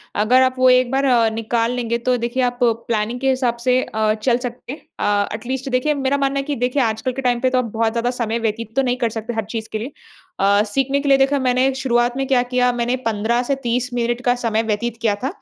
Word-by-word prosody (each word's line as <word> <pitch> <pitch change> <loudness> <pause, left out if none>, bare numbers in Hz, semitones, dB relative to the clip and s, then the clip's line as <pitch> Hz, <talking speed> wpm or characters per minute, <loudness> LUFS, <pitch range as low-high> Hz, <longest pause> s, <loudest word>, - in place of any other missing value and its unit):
अगर 230 +5 +4
आप 255 0 +1
वो 255 0 +6
एक 250 0 +4
बार 270 +1 +1 0.3
निकाल 230 +1 -1
लेंगे 235 -2 -1
तो 250 +2 0
देखिए 240 +2 -1
आप 245 0 -1
प्लानिंग 230 0 0
के 270 +1 +1
हिसाब 255 -3 0
से 255 0 +3
अ, 215 0 0
चल 235 +3 +1
सकते 245 0 -7
हैं। 300 - -11 0.2
अ, 205 0 +1
एटलीस्ट 260 +4 -4
देखिए 255 +4 +1
मेरा 275 -1 0
मानना 275 0 0
है - - -2
कि 290 +1 -3
देखिए 250 +3 0
आजकल 225 +2 -1
के 270 - -4
टाइम 245 -2 +1
पे 255 - +2
तो 255 - 0
आप 255 - +1
बहुत 225 0 +1
ज़्यादा 235 +1 -1
समय 235 -2 -2
व्यतीत 225 0 -3
तो 270 - +3
नहीं 250 -1 0
कर 240 -2 0
सकते 225 +2 -5
हर 220 -2 -2
चीज़ 225 -1 -5
के 220 - -2
लिए। 240 +6 -6 0.5
अ, 200 +1 +4
सीखने 270 +6 0
के 280 0 -2
लिए 275 - +6
देखिए 275 +1 +2
मैंने 260 +1 +2
शुरुआत 245 -2 +1
में 270 - -1
क्या 260 -2 +3
किया 250 0 +1
मैंने 240 +1 0
15 225 +2 0
से 275 +3 0
30 245 +1 -1
मिनट 240 0 -1
का 245 - +4
समय 225 -2 -1
व्यतीत 225 +2 -2
किया 220 -3 +1
था। - - +1
245 Hz, 250 wpm, -20 LUFS, 230-255 Hz, 0.5 s, वो